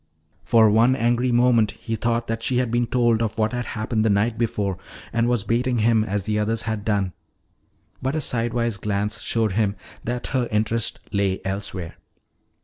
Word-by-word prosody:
For 115 -1 +5
one 115 +5 +4
angry 120 0 +1
moment 120 -2 +3
he 115 -2 -4
thought 115 +1 0
that 115 0 -3
she 125 +2 0
had 125 -2 0
been 120 0 +1
told 120 -2 +2
of 110 -2 -2
what 110 +1 +1
had 120 0 -3
happened 110 0 0
the 110 - +2
night 105 +3 +2
before 100 -5 -1 0.3
and 115 0 +2
was 120 -4 +1
baiting 120 +2 0
him, 110 0 +3
as 105 -2 -2
the 105 +1 0
others 110 +1 0
had 110 -2 -3
done. 100 -4 0 0.9
But 135 +3 -1
a 155 - 0
sidewise 115 -3 -1
glance 105 +1 -2
showed 110 -3 0
him 100 0 +1 0.3
that 120 +1 -3
her 125 -2 +1
interest 110 +1 0
lay 100 -2 0
elsewhere. 95 -3 -4
115 Hz, 180 wpm, -23 LUFS, 105-120 Hz, 0.9 s, For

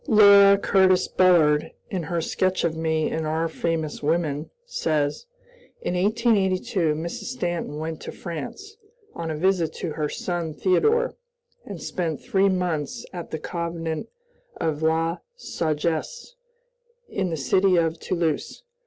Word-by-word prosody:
Laura 200 -2 +8
Curtis 190 -2 +3
Bullard, 160 -5 +4 0.2
in 185 - -1
her 170 +1 -2
sketch 185 +3 0
of 165 -2 0
me 160 -1 0
in 160 - -2
"Our 160 +1 0
Famous 160 -1 -2
Women," 155 -1 0 0.2
says: 155 - -1 0.5
"In - - -3
1882, 190 -5 +1
Mrs. 165 +2 -5
Stanton 175 - -3
went 160 0 -5
to - - -6
France, 190 - -7 0.4
on 165 -1 -5
a 155 - -3
visit 180 -1 +2
to 165 - -4
her 150 -1 -2
son 170 -4 -3
Theodore, 440 - +2 0.5
and - - -6
spent 165 -4 -3
three 195 0 +2
months 175 -6 -2
at 175 -2 -6
the - - -3
convent 165 -1 -4 0.5
of 155 -1 -1
La 165 +2 +1 0.2
Sagesse, 170 - -2 0.7
in 190 -2 -2
the 165 - -2
city 185 +8 +3
of 165 -1 +1
Toulouse." 170 - -2
170 Hz, 135 wpm, -24 LUFS, 160-190 Hz, 0.7 s, Laura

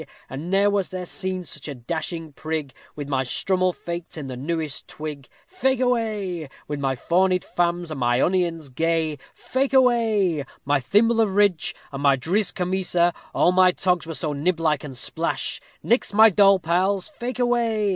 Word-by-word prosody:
_ - - -10 0.2
And 145 +6 -5
ne'er 200 +2 +3
was 200 -2 0
there 185 -1 -5
seen 185 0 -3
such 150 -2 -9
a 145 - -5
dashing 160 +4 -5
prig, 155 -2 -4 0.2
With 145 -2 -6
my 135 -2 0
strummel 185 +8 +1
faked 170 -1 -6
in 150 - -5
the 130 -1 -6
newest 155 +2 -3
twig. 150 -4 -7 0.2
Fake 265 -9 0
away. 215 - -1 0.2
With 145 -1 -4
my 135 -1 0
fawnied 180 +6 +1
famms, 175 -1 -1
and 150 - -5
my 120 0 +2
onions 170 -4 0
gay, 160 +1 0 0.2
Fake 270 +1 -1
away; 220 - +3 0.2
My 145 0 +2
thimble 225 - +3
of 200 -4 0
ridge, 200 -6 +2 0.2
and 140 0 -5
my 140 -1 +4
driz 180 +8 +1
kemesa; 180 -2 +1 0.2
All 175 - +4
my 185 0 +5
togs 180 -2 0
were 165 - -4
so 150 -2 -2
niblike 155 0 0
and 135 -4 -7
splash, 165 +6 -2 0.2
_Nix 235 -3 +1
my 220 +1 +8
doll 195 +1 +6
pals, 185 +3 0
fake 255 -5 -6
away. 235 -4 +1
175 Hz, 175 wpm, -23 LUFS, 150-200 Hz, 0.2 s, my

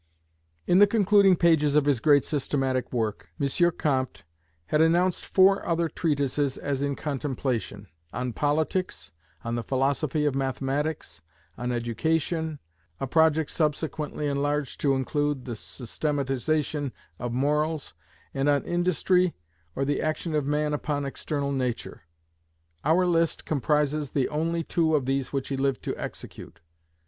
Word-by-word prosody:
In 180 - +4
the 205 - +8
concluding 200 -2 +5
pages 160 -4 +3
of 150 -2 +4
his 140 -5 +2
great 145 +1 +4
systematic 135 -3 -1
work, 110 -4 -2
M. 140 - +1 0.3
Comte 130 -8 -1 0.4
had 150 - +2
announced 175 +3 +3
four 195 +1 +4
other 170 0 0
treatises 145 -4 0
as 140 -1 -2
in 140 -1 0
contemplation: 130 - -3 0.3
on 125 -1 -3
Politics; 150 - -1 0.3
on 115 - -3
the 120 - -1
Philosophy 140 +4 0
of 145 - +2
Mathematics; 135 - -2 0.3
on 125 0 -3
Education, 155 +7 -1 0.4
a - - -1
project 160 +2 +3
subsequently 150 -1 -1
enlarged 145 0 -1
to 140 -2 +3
include 145 0 -1
the 120 -3 -4
systematization 140 +3 -2 0.3
of 120 0 -3
Morals; 150 - 0 0.4
and 135 +1 +1
on 145 -1 +2
Industry, 180 0 +1 0.4
or 135 - 0
the 145 0 0
action 155 +1 -2
of 150 -2 0
man 150 +1 0
upon 145 -1 -2
external 140 +1 -3
nature. 130 -3 -3 0.8
Our 175 +4 +3
list 165 -2 +1
comprises 150 0 0
the 135 -1 0
only 165 +2 -1
two 160 -1 +1
of 140 -4 +1
these 135 0 -1
which 135 -2 -2
he 135 - -2
lived 135 -3 0
to - - -2
execute. - - -8
145 Hz, 135 wpm, -26 LUFS, 135-160 Hz, 0.8 s, the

